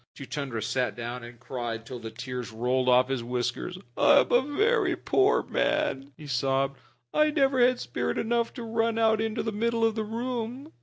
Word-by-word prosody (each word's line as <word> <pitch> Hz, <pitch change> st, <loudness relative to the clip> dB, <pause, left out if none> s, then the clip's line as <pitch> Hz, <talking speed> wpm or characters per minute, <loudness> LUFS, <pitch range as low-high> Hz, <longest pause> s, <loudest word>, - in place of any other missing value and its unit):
Chuchundra 130 Hz, -4 st, -4 dB
sat 125 Hz, +2 st, -1 dB
down 120 Hz, +1 st, -5 dB
and 120 Hz, 0 st, -11 dB
cried 120 Hz, -2 st, -5 dB
till 125 Hz, +1 st, -7 dB
the 115 Hz, -1 st, -6 dB
tears 125 Hz, +2 st, -6 dB
rolled 125 Hz, +3 st, +1 dB
off 125 Hz, 0 st, +5 dB
his 130 Hz, -3 st, -1 dB
whiskers. 125 Hz, +8 st, -3 dB, 0.2 s
"I 285 Hz, -1 st, +6 dB
am -, -, -4 dB
a 245 Hz, -, +6 dB
very 375 Hz, -, +1 dB
poor 395 Hz, +2 st, +2 dB
man," 135 Hz, +1 st, 0 dB
he 155 Hz, -, -11 dB
sobbed. 135 Hz, 0 st, 0 dB, 0.3 s
"I 305 Hz, 0 st, +4 dB
never 275 Hz, -3 st, +2 dB
had 250 Hz, 0 st, +4 dB
spirit -, -, -2 dB
enough 235 Hz, 0 st, 0 dB
to 240 Hz, -, -6 dB
run 225 Hz, 0 st, 0 dB
out 220 Hz, -1 st, +3 dB
into 220 Hz, -1 st, -1 dB
the 220 Hz, -, -2 dB
middle 230 Hz, +2 st, +1 dB
of 225 Hz, -, +2 dB
the 220 Hz, 0 st, -2 dB
room. 240 Hz, +5 st, -4 dB
155 Hz, 190 wpm, -27 LUFS, -, 0.3 s, I